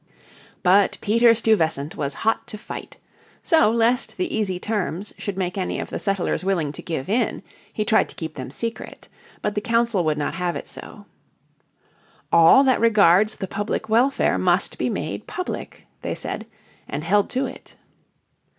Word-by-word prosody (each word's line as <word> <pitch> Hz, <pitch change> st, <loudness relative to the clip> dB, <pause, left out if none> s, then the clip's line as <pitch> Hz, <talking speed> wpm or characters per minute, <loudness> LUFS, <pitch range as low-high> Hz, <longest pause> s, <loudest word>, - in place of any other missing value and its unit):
But 190 Hz, +2 st, +4 dB
Peter 230 Hz, +3 st, +4 dB
Stuyvesant 160 Hz, -10 st, +1 dB
was 140 Hz, -2 st, -3 dB
hot 225 Hz, -, +1 dB
to 215 Hz, -, -7 dB
fight. 210 Hz, -, -9 dB, 0.5 s
So 320 Hz, -9 st, +4 dB
lest 235 Hz, +3 st, +1 dB
the 365 Hz, -, -2 dB
easy 195 Hz, -5 st, -1 dB
terms 205 Hz, -2 st, -3 dB
should 200 Hz, -2 st, -4 dB
make 185 Hz, 0 st, -2 dB
any 185 Hz, -, -2 dB
of -, -, -6 dB
the -, -, -3 dB
settlers 195 Hz, -2 st, -1 dB
willing 175 Hz, -7 st, 0 dB
to -, -, -9 dB
give 160 Hz, -6 st, -4 dB
in 225 Hz, -1 st, 0 dB, 0.3 s
he 215 Hz, -, -2 dB
tried 220 Hz, +1 st, +3 dB
to -, -, -14 dB
keep 160 Hz, -1 st, -6 dB
them 130 Hz, -3 st, -7 dB
secret. 230 Hz, -, -6 dB, 0.3 s
But 210 Hz, -, 0 dB
the 210 Hz, -, -2 dB
Council 230 Hz, -4 st, +1 dB
would 155 Hz, -2 st, 0 dB
not 150 Hz, -, -2 dB
have 180 Hz, -1 st, -2 dB
it -, -, -6 dB
so. -, -, -11 dB, 1.3 s
"All 170 Hz, +11 st, +7 dB
that 260 Hz, -2 st, +3 dB
regards 215 Hz, -2 st, +4 dB
the 190 Hz, -, -5 dB
public 205 Hz, +2 st, -3 dB
welfare 245 Hz, +5 st, +2 dB
must -, -, +1 dB
be -, -, 0 dB
made -, -, -4 dB
public," 365 Hz, -, -6 dB, 0.2 s
they -, -, -3 dB
said, 220 Hz, -, -6 dB, 0.4 s
and 145 Hz, +2 st, -4 dB
held 200 Hz, +4 st, +2 dB
to 260 Hz, +1 st, -1 dB
it. -, -, -10 dB
205 Hz, 170 wpm, -23 LUFS, 175-225 Hz, 1.3 s, All